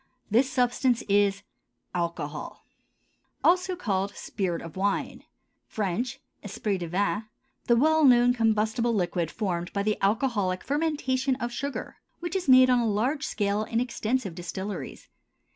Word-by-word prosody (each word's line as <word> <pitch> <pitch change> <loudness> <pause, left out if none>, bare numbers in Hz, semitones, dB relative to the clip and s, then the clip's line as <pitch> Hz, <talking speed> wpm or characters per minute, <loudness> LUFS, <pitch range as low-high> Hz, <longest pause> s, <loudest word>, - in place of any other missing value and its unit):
This 250 +5 +4
substance 250 -1 +1
is— 200 -1 +2 0.5
ALCOHOL, 170 -4 -4 0.8
also 365 +1 +3
called 200 - -2
spirit 180 -5 -3
of 165 -2 -9
wine; 200 +1 -2 0.4
French, 215 +4 -2 0.2
esprit 205 -1 -2
de 175 - -4
vin; 200 +5 0 0.4
the 235 - +4
well 315 +5 +4
known 245 -2 +6
combustible 225 0 +1
liquid 175 -3 0
formed 175 -4 -3
by 200 - 0
the 215 0 0
alcoholic 200 -3 +1
fermentation 275 -3 0
of 240 -2 -4
sugar, 280 +3 -5 0.2
which 345 +1 -4
is 365 -6 -1
made 255 0 +8
on 250 - +4
a 235 - +1
large 260 +9 0
scale 205 0 0
in 230 +1 -1
extensive 240 -4 -1
distilleries. 190 +4 -6
220 Hz, 135 wpm, -27 LUFS, 195-255 Hz, 0.8 s, made